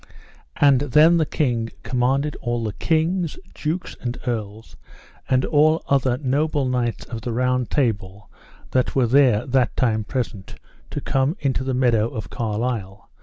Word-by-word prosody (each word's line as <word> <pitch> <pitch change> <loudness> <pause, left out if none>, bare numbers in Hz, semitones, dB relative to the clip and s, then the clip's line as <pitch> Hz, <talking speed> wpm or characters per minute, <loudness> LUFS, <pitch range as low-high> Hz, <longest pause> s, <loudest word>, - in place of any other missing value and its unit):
And 140 -3 +5
then 150 +5 +5
the 160 -2 +1
king 120 -6 -1
commanded 135 +4 0
all 120 -2 -2
the 105 -2 -3
kings, 165 - 0 0.2
dukes, 165 +4 -4
and 120 0 -3
earls, 110 -3 -4 0.5
and 130 0 +2
all 155 +2 +3 0.4
noble 145 +2 +1
knights 120 -4 -1
of 115 -2 -7
the 120 - -4
Round 125 +1 0
Table 105 -7 -1 0.4
that 130 -1 0
were 130 -2 +3
there 125 -3 +4
that 130 -1 +1
time 110 -4 +1
present, 110 -4 -4 0.3
to - - -5
come 135 +7 0
into 135 -2 -1
the 130 -1 -2
meadow 120 -4 +2
of 110 -4 -7
Carlisle. 105 -4 -3
125 Hz, 145 wpm, -22 LUFS, 115-140 Hz, 0.5 s, And